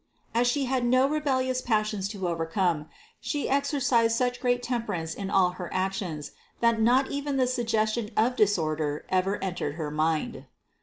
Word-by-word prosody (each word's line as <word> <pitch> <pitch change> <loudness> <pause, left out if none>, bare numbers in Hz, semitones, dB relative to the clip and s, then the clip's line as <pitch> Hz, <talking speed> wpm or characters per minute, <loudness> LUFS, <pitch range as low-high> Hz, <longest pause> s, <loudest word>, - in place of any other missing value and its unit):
As 240 +2 +3
She 275 +2 +1
had 260 -1 0
no 255 +2 +4
rebellious 260 -4 0
passions 215 -4 0
to 195 -4 -3
overcome, 165 -1 0 0.3
She 290 -2 -2
exercised 265 -5 +2
such 245 0 0
great 245 0 +1
temper 240 -2 -2
ance 160 -1 -4
in 195 -1 -5
all 185 -2 +3
her 180 -1 -7
actions, 185 -5 -2 0.3
that 230 -1 +3
not 255 +4 +3
even 285 0 -2
the 260 - +3
suggestion 225 -3 0
of 240 +3 +3
disorder 155 -8 +1
ever 190 +2 +1
entered 175 -6 -3
her 155 -3 -4
mind. 155 +1 -1
220 Hz, 160 wpm, -27 LUFS, 180-255 Hz, 0.3 s, no